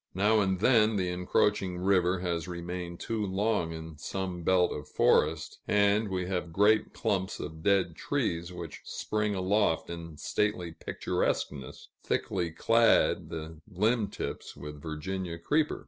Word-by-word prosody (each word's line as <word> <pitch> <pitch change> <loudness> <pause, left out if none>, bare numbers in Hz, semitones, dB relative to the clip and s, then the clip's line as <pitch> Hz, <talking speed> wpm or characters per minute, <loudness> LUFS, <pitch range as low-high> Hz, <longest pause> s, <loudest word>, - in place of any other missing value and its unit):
Now 105 +3 +4
and 95 -2 +1
then 110 -2 +5
the 95 -3 0
encroaching 90 +1 +1
river 90 -1 +2
has 85 -2 -2
remained 85 0 -5
too 110 -2 -2
long 100 -3 0
in 80 -1 -8
some 90 +2 -4
belt 90 +1 +3
of 75 - -6
forest, - - +2
and 105 +1 +3
we 90 -1 -1
have 90 -2 -3
great 105 +5 +3
clumps 95 -1 -1
of 80 0 -6
dead 95 -3 +2
trees, 85 +1 -2
which 85 -3 -8
spring 105 -1 -2
aloft 95 -3 +1
in 85 -2 -7
stately 90 -1 -1
picturesqueness, 70 -3 -3
thickly 90 -3 -1
clad 115 +7 +3
to - - -5
the 80 0 -7 0.2
limb 110 0 +3
tips - - -6
with 75 +1 -8
Virginia 85 +3 -4
creeper. 150 - +1
90 Hz, 145 wpm, -29 LUFS, 85-105 Hz, 0.2 s, then